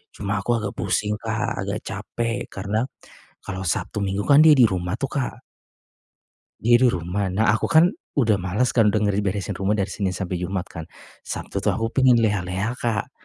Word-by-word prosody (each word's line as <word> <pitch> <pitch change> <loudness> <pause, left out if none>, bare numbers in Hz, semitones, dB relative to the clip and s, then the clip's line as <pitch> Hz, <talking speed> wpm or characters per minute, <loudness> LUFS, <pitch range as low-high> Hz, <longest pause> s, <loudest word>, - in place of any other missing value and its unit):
Cuma 100 0 -2
aku 120 -1 +1
agak 100 - -2
pusing 105 0 0
Kak 115 +1 -2
agak 100 +2 -3
capek 115 +2 -3
karena 105 +4 -2 0.6
kalau 95 -1 -5
Sabtu 95 +5 -2
Minggu 100 +1 -2
kan 145 +1 +7
dia 160 - +8
di 125 - +7
rumah 90 -1 -3
tuh 135 - -1
Kak. 140 -3 -2 1.3
Diri 120 +2 +5
rumah, 95 -1 -1
nah 110 +2 +3
aku 110 - +1
kan, 170 +3 +5 0.2
udah 115 -7 +2
males 100 +7 0
kan, 115 -3 +3
dengeri 105 -2 +1
beresin 100 0 -3
rumah 100 +2 +1
dari 100 -2 -1
Senin 95 -3 -2
sampai 90 -1 -3
Jumat 90 +1 -3
kan, 80 - -7 0.4
Sabtu - - -4
tuh, - - 0
aku 115 0 -2
pengen 130 -2 +4
leha-leha, 105 +2 -1
Kak. 110 -4 -2
105 Hz, 175 wpm, -23 LUFS, 95-115 Hz, 1.3 s, dia